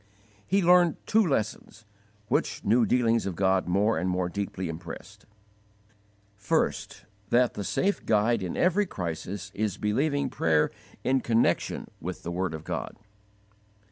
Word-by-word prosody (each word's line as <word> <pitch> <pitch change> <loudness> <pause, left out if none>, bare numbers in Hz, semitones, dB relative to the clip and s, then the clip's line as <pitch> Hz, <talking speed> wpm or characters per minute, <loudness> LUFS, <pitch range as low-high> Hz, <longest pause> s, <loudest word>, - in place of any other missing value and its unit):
He 195 +1 +2
learned 175 -2 +5
two 220 +1 +4
lessons, 110 - -2 0.4
which - - -1
new 115 +3 +4
dealings 115 -4 +2
of 95 - -3
God 95 0 +2
more 100 +1 +2
and 90 +2 -1
more 90 -1 0
deeply 95 -1 -4
impressed: 85 +4 -9 1.1
First, 100 -1 -1 0.2
that 120 0 +3
the 100 - -4
safe 195 - 0
guide 110 +1 +3
in 90 -2 -4
every 190 +3 +2
crisis 95 - -5
is 105 -2 -2
believing 140 +5 0
prayer 80 -10 +2 0.3
in 130 0 +2
connection 115 -1 +1
with 90 +1 -6
the 85 - -4
word 90 -2 -2
of 80 - -8
God. - - -5
105 Hz, 140 wpm, -27 LUFS, 90-125 Hz, 1.1 s, learned